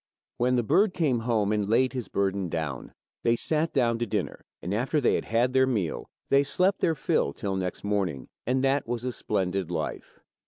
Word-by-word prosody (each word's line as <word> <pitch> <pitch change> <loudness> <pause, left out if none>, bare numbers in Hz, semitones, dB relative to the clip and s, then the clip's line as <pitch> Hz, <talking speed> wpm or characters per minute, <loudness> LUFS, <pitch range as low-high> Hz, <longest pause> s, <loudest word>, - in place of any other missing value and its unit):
When 125 +1 +2
the 120 - +2
bird 190 - +3
came 150 -9 +1
home 110 -3 +1
and 105 -2 0
laid 130 +3 +3
his 125 -3 -4
burden 100 -2 -1
down, 80 -6 -4 0.3
they 115 - +3
sat 155 +6 0
down 120 -4 +1
to 120 - -1
dinner, - - -3 0.2
and 90 - -4
after 125 +8 +1
they 130 - +3
had - - -1
had 120 +3 +1
their 130 0 +4
meal, 105 -11 -2 0.2
they 140 - +5
slept 185 +7 +1
their 165 - +2
fill 70 - 0
till 100 -2 -3
next 90 -2 -3
morning, 95 -10 -1 0.2
and 130 +1 +1
that 135 0 +1
was 120 +1 -3
a 125 - -1
splendid 95 -5 -2
life. 80 -3 -5
115 Hz, 200 wpm, -27 LUFS, 100-130 Hz, 0.3 s, they